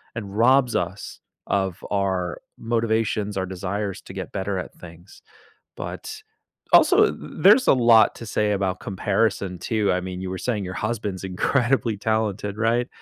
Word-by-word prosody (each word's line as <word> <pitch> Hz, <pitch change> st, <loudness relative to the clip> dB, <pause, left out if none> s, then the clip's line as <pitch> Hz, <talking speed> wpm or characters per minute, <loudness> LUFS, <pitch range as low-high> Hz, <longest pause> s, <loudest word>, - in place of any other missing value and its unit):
and 100 Hz, -3 st, -6 dB
robs 125 Hz, +1 st, +4 dB
us 90 Hz, +3 st, -4 dB, 0.3 s
of 95 Hz, -2 st, -1 dB
our 95 Hz, -3 st, -1 dB, 0.2 s
motivations 110 Hz, -3 st, -1 dB
our 95 Hz, -, -1 dB
desires 95 Hz, +2 st, -4 dB
to -, -, -12 dB
get 95 Hz, -1 st, -6 dB
better 95 Hz, 0 st, -2 dB
at -, -, -7 dB
things, 85 Hz, +2 st, -14 dB, 0.6 s
but, 435 Hz, 0 st, -7 dB, 0.5 s
also, 425 Hz, +3 st, +6 dB
th -, -, -8 dB, 0.3 s
there's 225 Hz, +6 st, +7 dB
a -, -, +7 dB
lot 115 Hz, -2 st, +5 dB
to 115 Hz, -, -9 dB
say 105 Hz, -1 st, 0 dB
about 95 Hz, -2 st, -1 dB
comparison, 95 Hz, -2 st, -1 dB
too, 110 Hz, -3 st, 0 dB
I 90 Hz, 0 st, 0 dB
mean, 90 Hz, 0 st, -6 dB
you 95 Hz, -, -4 dB
were 95 Hz, -, -4 dB
saying 105 Hz, -6 st, -2 dB
your 90 Hz, -, -5 dB
husband's 105 Hz, -4 st, -3 dB
incredibly 115 Hz, +4 st, 0 dB
talented, 105 Hz, -1 st, -1 dB
right? 115 Hz, +3 st, +1 dB
100 Hz, 155 wpm, -23 LUFS, 95-115 Hz, 0.6 s, there's